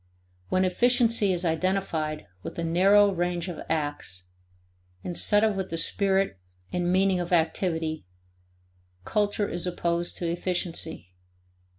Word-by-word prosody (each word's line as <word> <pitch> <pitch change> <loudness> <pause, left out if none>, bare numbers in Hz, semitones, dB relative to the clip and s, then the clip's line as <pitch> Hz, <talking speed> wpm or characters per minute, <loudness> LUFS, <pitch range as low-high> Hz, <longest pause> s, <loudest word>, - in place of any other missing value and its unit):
When 185 0 +2
efficiency 230 +1 +3
is 180 0 +1
identified 160 -2 -1 0.2
with - - -8
a 170 - -2
narrow 195 +5 +5
range 175 -1 -2
of 175 -3 -6
acts, 145 - -2 0.8
instead 205 +4 +2
of 215 -2 +2
with 190 -1 -3
the 165 - -3
spirit 195 - +1 0.3
and 175 0 0
meaning 190 0 +3
of 175 0 -4
activity, 160 - 0 1.0
culture 205 0 0
is 175 0 -3
opposed 170 -1 -2
to 175 - -2
efficiency. 170 - -3
175 Hz, 120 wpm, -26 LUFS, 165-195 Hz, 1.0 s, narrow